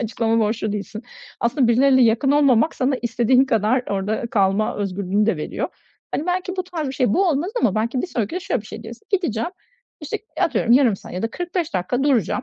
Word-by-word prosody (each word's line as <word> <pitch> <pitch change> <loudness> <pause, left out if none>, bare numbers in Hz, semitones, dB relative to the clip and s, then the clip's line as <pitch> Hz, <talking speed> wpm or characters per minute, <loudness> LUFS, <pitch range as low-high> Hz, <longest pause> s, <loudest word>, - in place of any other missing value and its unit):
açıklama 230 -1 0
borçlu 215 0 -1
değilsin. 210 +2 -5 0.4
Aslında 235 +1 +2
birileriyle 260 +2 +5
yakın 235 +4 +3
olmamak 285 -1 +3
sana 265 +1 +1
istediğin 240 +2 +3
kadar 230 0 +1
orada 205 +4 -1
kalma 200 -1 +1
özgürlüğünü 200 +1 -1
de 225 - +1
veriyor. 150 - -3 0.4
Hani, 310 - -2
belki 365 +1 -2
bu 370 - -2
tarz 335 -5 -4
bir 265 - -4
şey, 250 -6 +1
bu 385 0 +3
olmaz 320 +4 0
ama 200 - +2
belki 235 +4 -1
bir - - -2
sonraki 235 - -3
de - - -2
şöyle - - -1
bir 210 - -14
şey 220 - -9
deriz: 230 +1 -10
Gideceğim, 340 - 0 0.5
işte, 320 +8 -4 0.2
atıyorum, 235 - +2
yarım 245 -5 +5
saat - - -12
ya 180 - -4
da 225 - -1
45 350 - -3
dakika 185 +8 -1
duracağım, 250 - +1
235 Hz, 205 wpm, -21 LUFS, 215-285 Hz, 0.5 s, birileriyle